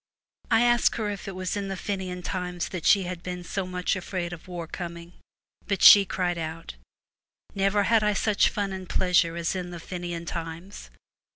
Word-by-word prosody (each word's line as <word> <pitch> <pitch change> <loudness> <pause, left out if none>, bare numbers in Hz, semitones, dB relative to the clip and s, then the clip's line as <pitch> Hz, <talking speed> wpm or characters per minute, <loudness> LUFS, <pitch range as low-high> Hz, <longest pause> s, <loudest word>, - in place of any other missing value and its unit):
I 225 0 +4
asked 240 -1 +3
her 215 -2 -2
if 200 -1 -7
it 195 - -5
was 185 0 -3
in 200 -1 -3
the 195 -1 -4
Fenian 185 -3 -4
times 180 -2 -3
that 180 -4 -3
she 200 -2 +5
had 180 -1 -5
been 180 0 -6
so 185 +2 -3
much 180 +1 -1
afraid 180 -1 -4
of 170 - -11
war 175 -2 -5
coming. 170 +1 -7 0.5
But 200 -1 -1
she 200 -1 +10
cried 175 -2 -1
out, 160 +1 -6 0.4
' - - -68 0.3
Never 195 +1 +2
had 225 +1 +3
I 210 0 +2
such 205 0 +2
fun 200 -2 -2
and 185 -1 -7
pleasure 180 -2 +2
as 170 +2 -2
in 180 -1 -4
the 175 -1 -7
Fenian 175 -1 -5
times. 170 +4 -7
180 Hz, 195 wpm, -26 LUFS, 175-195 Hz, 0.5 s, she